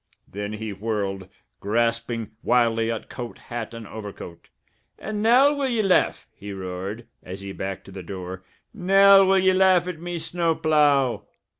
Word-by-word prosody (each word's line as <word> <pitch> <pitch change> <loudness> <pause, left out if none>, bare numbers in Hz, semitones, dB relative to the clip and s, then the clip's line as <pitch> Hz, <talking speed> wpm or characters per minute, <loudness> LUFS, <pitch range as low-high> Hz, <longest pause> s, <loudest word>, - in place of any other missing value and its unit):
Then 105 +1 -5
he 110 -1 -5
whirled, 100 -2 -3 0.3
grasping 115 +1 -1
wildly 115 -2 +2
at 115 - -5
coat, 120 -1 -7
hat, 120 -2 -6
and 115 -1 -8
overcoat. 105 -6 -9 0.5
"And 210 0 -4
now 255 +6 +5
will 285 -2 -1
ye 235 -4 0
laugh?" 190 -2 +2
he 100 0 -8
roared, 95 +4 -6 0.2
as 95 +2 -8
he 100 0 -7
backed 95 0 -5
to 95 - -12
the 95 0 -8
door. 95 0 -7 0.3
"Now 195 0 +6
will 190 0 +4
ye 190 0 +4
laugh 185 -2 +4
at 180 -3 -5
me 175 0 -4
snow 165 0 -1
plough?" 145 -9 +2
115 Hz, 160 wpm, -24 LUFS, -, 0.5 s, Now